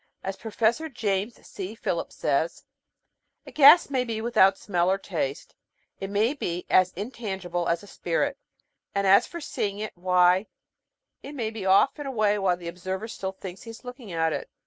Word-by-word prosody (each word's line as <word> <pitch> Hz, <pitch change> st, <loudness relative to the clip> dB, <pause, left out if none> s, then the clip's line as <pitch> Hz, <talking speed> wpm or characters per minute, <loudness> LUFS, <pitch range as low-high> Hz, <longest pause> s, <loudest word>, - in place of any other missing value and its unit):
As 195 Hz, 0 st, -3 dB
Professor 230 Hz, +9 st, 0 dB
James 210 Hz, -3 st, -2 dB
C. 200 Hz, +2 st, -7 dB
Philip 170 Hz, -6 st, -3 dB
says: 150 Hz, +4 st, -1 dB, 0.8 s
A -, -, -11 dB
gas 295 Hz, +1 st, +7 dB
may 260 Hz, -2 st, +1 dB
be 225 Hz, -3 st, -3 dB
without 200 Hz, -4 st, +4 dB
smell 175 Hz, -3 st, 0 dB
or 190 Hz, -, +2 dB
taste, 160 Hz, -8 st, -4 dB, 0.5 s
it 195 Hz, -, -4 dB
may 215 Hz, +6 st, +2 dB
be 180 Hz, -, -4 dB
as 185 Hz, -1 st, +5 dB
intangible 190 Hz, -5 st, -4 dB
as 170 Hz, +4 st, 0 dB
a -, -, -12 dB
spirit, 275 Hz, +12 st, -2 dB, 0.6 s
and 200 Hz, 0 st, +1 dB
as 195 Hz, +1 st, +6 dB
for 340 Hz, -, -7 dB
seeing 205 Hz, -9 st, -3 dB
it, 215 Hz, +1 st, -5 dB
why> 180 Hz, +2 st, +3 dB, 0.7 s
it 285 Hz, -, -9 dB
may 225 Hz, -5 st, -2 dB
be 215 Hz, -4 st, -5 dB
off 195 Hz, +10 st, +4 dB
and 290 Hz, -, -5 dB
away 215 Hz, -5 st, +1 dB
while 185 Hz, -3 st, +1 dB
the 175 Hz, -1 st, -9 dB
observer 185 Hz, +4 st, -4 dB
still 195 Hz, -4 st, -5 dB
thinks 190 Hz, -1 st, -9 dB
he 230 Hz, -, -10 dB
is 225 Hz, +1 st, -10 dB
looking 250 Hz, -4 st, -9 dB
at 165 Hz, -1 st, +1 dB
it. -, -, -5 dB
200 Hz, 180 wpm, -26 LUFS, 180-230 Hz, 0.8 s, gas